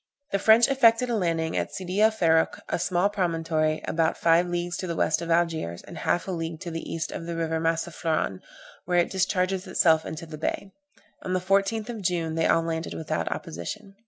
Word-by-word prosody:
The 200 Hz, -, +1 dB
French 220 Hz, +3 st, +6 dB
effected 250 Hz, -2 st, +4 dB
a -, -, +1 dB
landing 165 Hz, -5 st, 0 dB
at -, -, -2 dB
Sidy 185 Hz, +2 st, -2 dB
el 220 Hz, -, +7 dB
Ferruch, 165 Hz, -7 st, +2 dB
a -, -, -1 dB
small 180 Hz, +2 st, +2 dB
promontory, 165 Hz, -5 st, 0 dB
about 160 Hz, -1 st, +1 dB
five 170 Hz, +1 st, +3 dB
leagues 175 Hz, 0 st, -2 dB
to 185 Hz, -, -4 dB
the 170 Hz, -, -3 dB
west 155 Hz, 0 st, +1 dB
of 170 Hz, -, -5 dB
Algiers, 165 Hz, -, 0 dB
and -, -, -10 dB
half 175 Hz, -, 0 dB
a -, -, -2 dB
league 165 Hz, -2 st, -4 dB
to 175 Hz, -2 st, -5 dB
the 165 Hz, 0 st, -5 dB
east 165 Hz, -, -3 dB
of 165 Hz, -, -6 dB
the 170 Hz, -, -3 dB
river 165 Hz, -1 st, -1 dB
Massaflran, 165 Hz, -, -1 dB, 0.5 s
where 180 Hz, 0 st, +1 dB
it 175 Hz, -, +2 dB
discharges 190 Hz, 0 st, 0 dB
itself 160 Hz, -3 st, +3 dB
into 160 Hz, +1 st, -6 dB
the 155 Hz, -2 st, -9 dB
bay. 195 Hz, +4 st, -3 dB, 0.5 s
On 185 Hz, -, -3 dB
the 185 Hz, -, +2 dB
14th 195 Hz, +4 st, +1 dB
of 230 Hz, -3 st, -5 dB
June 170 Hz, -3 st, -1 dB
they 165 Hz, 0 st, +1 dB
all 165 Hz, -, +3 dB
landed 165 Hz, 0 st, -3 dB
without 160 Hz, -, -2 dB
opposition. 195 Hz, -, -6 dB
170 Hz, 205 wpm, -26 LUFS, 160-190 Hz, 0.5 s, el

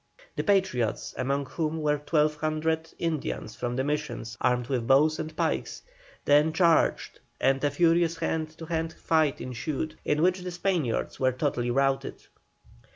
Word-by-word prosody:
The -, -, -1 dB
Patriots, 185 Hz, -, +1 dB
among 140 Hz, +2 st, -1 dB
whom 155 Hz, +3 st, -2 dB
were 150 Hz, -1 st, +1 dB
1,200 155 Hz, +1 st, 0 dB
Indians 155 Hz, -9 st, -3 dB
from 120 Hz, 0 st, -3 dB
the 130 Hz, -, 0 dB
Missions, 145 Hz, -6 st, -3 dB
armed 125 Hz, -1 st, +2 dB
with 125 Hz, -3 st, -2 dB
bows 150 Hz, +4 st, +4 dB
and 155 Hz, 0 st, -5 dB
pikes, -, -, -2 dB, 0.4 s
then 150 Hz, +2 st, +4 dB
charged, 170 Hz, -1 st, +2 dB, 0.2 s
and 135 Hz, +1 st, +2 dB
a 145 Hz, -, +3 dB
furious 165 Hz, +2 st, +2 dB
hand 160 Hz, -1 st, -1 dB
to 165 Hz, -, -8 dB
hand 160 Hz, 0 st, -2 dB
fight 155 Hz, -4 st, +1 dB
ensued, 135 Hz, +5 st, -4 dB
in 150 Hz, +2 st, +1 dB
which 185 Hz, +1 st, +3 dB
the 180 Hz, -, -5 dB
Spaniards 175 Hz, -8 st, -1 dB
were 130 Hz, -1 st, +3 dB
totally 125 Hz, -2 st, -1 dB
routed. 135 Hz, +2 st, 0 dB
150 Hz, 150 wpm, -27 LUFS, 135-160 Hz, 0.4 s, bows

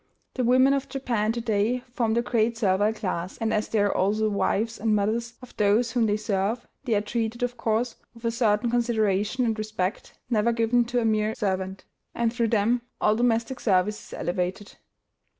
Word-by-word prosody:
The 255 Hz, -, -1 dB
women 260 Hz, +3 st, +5 dB
of 275 Hz, -1 st, -2 dB
Japan 235 Hz, -6 st, -1 dB
to 235 Hz, -, -3 dB
day 225 Hz, +3 st, 0 dB
form 230 Hz, -3 st, 0 dB
the 235 Hz, -, +2 dB
great 230 Hz, -1 st, +1 dB
servile 205 Hz, -1 st, +2 dB
class, 185 Hz, -5 st, -4 dB
and, 225 Hz, -1 st, -1 dB
as 215 Hz, -, 0 dB
they 225 Hz, -, -1 dB
are 205 Hz, -, +1 dB
also 205 Hz, +3 st, +1 dB
the 215 Hz, -, +3 dB
wives 220 Hz, +3 st, 0 dB
and 220 Hz, -1 st, +2 dB
mothers 230 Hz, +3 st, -1 dB
of 250 Hz, -, -13 dB
those 210 Hz, +3 st, +3 dB
whom 235 Hz, -3 st, +2 dB
they 205 Hz, 0 st, +1 dB
serve, 210 Hz, +2 st, -1 dB, 0.2 s
they 235 Hz, -4 st, +1 dB
are 205 Hz, -, +2 dB
treated, 225 Hz, +2 st, -2 dB
of 245 Hz, 0 st, -1 dB
course, 230 Hz, +1 st, -1 dB, 0.2 s
with 230 Hz, 0 st, -11 dB
a 230 Hz, -, +2 dB
certain 230 Hz, 0 st, +1 dB
consideration 225 Hz, -1 st, +1 dB
and 225 Hz, -2 st, -1 dB
respect 215 Hz, -3 st, -3 dB
never 235 Hz, -1 st, +2 dB
given 235 Hz, +1 st, +2 dB
to 240 Hz, +1 st, 0 dB
a -, -, 0 dB
mere 215 Hz, 0 st, +1 dB
servant; 190 Hz, -1 st, -2 dB, 0.3 s
and 235 Hz, -1 st, 0 dB
through 235 Hz, -2 st, +1 dB
them, 230 Hz, +2 st, +2 dB, 0.2 s
all 210 Hz, -, +3 dB
domestic 235 Hz, +2 st, 0 dB
service 205 Hz, 0 st, +1 dB
is -, -, -12 dB
elevated. 180 Hz, +3 st, -3 dB
225 Hz, 195 wpm, -26 LUFS, 210-235 Hz, 0.3 s, women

